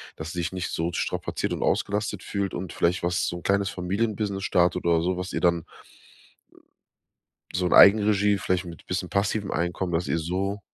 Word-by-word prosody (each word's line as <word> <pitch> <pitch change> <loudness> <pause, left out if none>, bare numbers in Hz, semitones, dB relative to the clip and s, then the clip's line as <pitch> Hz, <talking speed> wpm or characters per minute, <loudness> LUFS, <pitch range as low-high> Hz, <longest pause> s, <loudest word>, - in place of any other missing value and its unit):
dass 80 +2 -6
sie 90 - -4
sich 85 +2 -2
nicht 90 -2 -3
so 85 +1 -1
strapaziert - - -2
und - - -4
ausgelastet 105 -1 -1
fühlt 100 -2 -3
und 90 0 -5
vielleicht 85 +1 0
was 90 0 0
so 85 - -3
'n 85 - -11
kleines 100 0 +1
Familienbusiness 100 +1 -2
startet 90 -1 +2
oder 85 -1 +3
so, 90 0 0
was 90 0 -5
ihr - - -2
dann 85 -2 +2 1.9
so 90 0 +1
in - - +1
Eigenregie, 105 0 +6
vielleicht 90 0 -1
mit 85 -1 -10
bisschen 90 -1 -2
passivem 100 +1 -1
Einkommen, 85 +2 -2
dass 85 +2 0
ihr 80 - 0
so 95 +5 -2
90 Hz, 185 wpm, -25 LUFS, 85-100 Hz, 1.9 s, Eigenregie